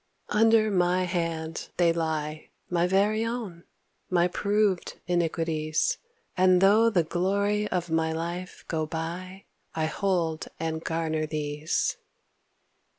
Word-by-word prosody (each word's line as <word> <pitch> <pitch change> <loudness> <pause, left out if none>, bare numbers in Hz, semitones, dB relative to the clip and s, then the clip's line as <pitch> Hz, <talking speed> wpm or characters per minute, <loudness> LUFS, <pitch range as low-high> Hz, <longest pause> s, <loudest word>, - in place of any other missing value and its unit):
Under 220 0 +4
my 180 -1 +2
hand 165 -3 -3
they 170 -2 +4
lie, 155 -2 -3 0.2
My 175 0 +2
very 205 +4 +2
own, 225 -8 -4 0.4
my 175 -1 +3
proved 200 0 0
iniquities, 165 -3 0 0.4
And 185 -1 +5
though 210 +4 +5
the 185 -6 +2
glory 200 +5 0
of 175 -3 -2
my 160 0 +1
life 170 +3 -5
go 155 -2 -1
by 175 +4 -5 0.3
I 160 -1 0
hold 165 -2 -1
and 160 0 -3
garner 160 -1 -1
these. 150 0 -1
175 Hz, 115 wpm, -27 LUFS, 160-195 Hz, 0.4 s, And